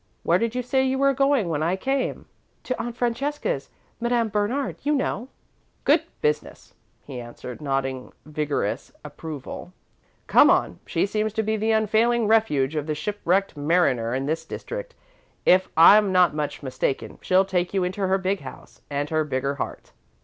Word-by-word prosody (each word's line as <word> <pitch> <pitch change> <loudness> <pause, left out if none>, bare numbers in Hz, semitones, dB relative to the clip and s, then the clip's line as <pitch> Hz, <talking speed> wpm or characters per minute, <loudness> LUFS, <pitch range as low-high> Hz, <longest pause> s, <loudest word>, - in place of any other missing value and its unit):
"Where 175 +2 +3
did 230 +2 -1
you 250 - -1
say 265 +2 +1
you 265 0 0
were 275 0 +3
going, 275 -6 +2
when 155 -3 -1
I 170 +4 +1
came?" 265 +7 -2 0.4
"To 255 - -3
Aunt 240 0 -5
Francesca's 280 - -2 0.3
Madame 235 -1 +1
Bernard, 215 +7 -1
you 295 +1 +1
know." 250 -3 -2 0.6
"Good - - +4 0.2
business," 450 -1 -2 0.3
he 130 -3 -7
answered, 120 +3 -9
nodding 135 -2 -2
vigorous 150 -8 -2
approval. 150 +3 -8 0.5
"Come - - +6
on. - - +2
She - - +1
seems 215 +1 -1
to 220 - 0
be 220 +1 0
the 220 +1 -1
unfailing 220 +2 +2
refuge 180 -11 +2
of 150 0 -2
the 155 - -1
shipwrecked 195 +2 0
mariner 145 -6 +1
in 135 +1 -2
this 160 +2 -1
district. - - -7 0.5
If 185 +1 +5
I'm 200 +4 +7
not 180 -3 +4
much 150 -1 -4
mistaken, 130 0 -3
she'll 185 +1 +3
take 180 -2 -1
you 195 -2 0
into 190 +2 -1
her 190 +1 +3
big 190 +1 -1
house 130 -2 -12
and 145 0 -2
her 155 0 +2
bigger 135 -1 -1
heart." - - -6
190 Hz, 165 wpm, -24 LUFS, 150-230 Hz, 0.6 s, I'm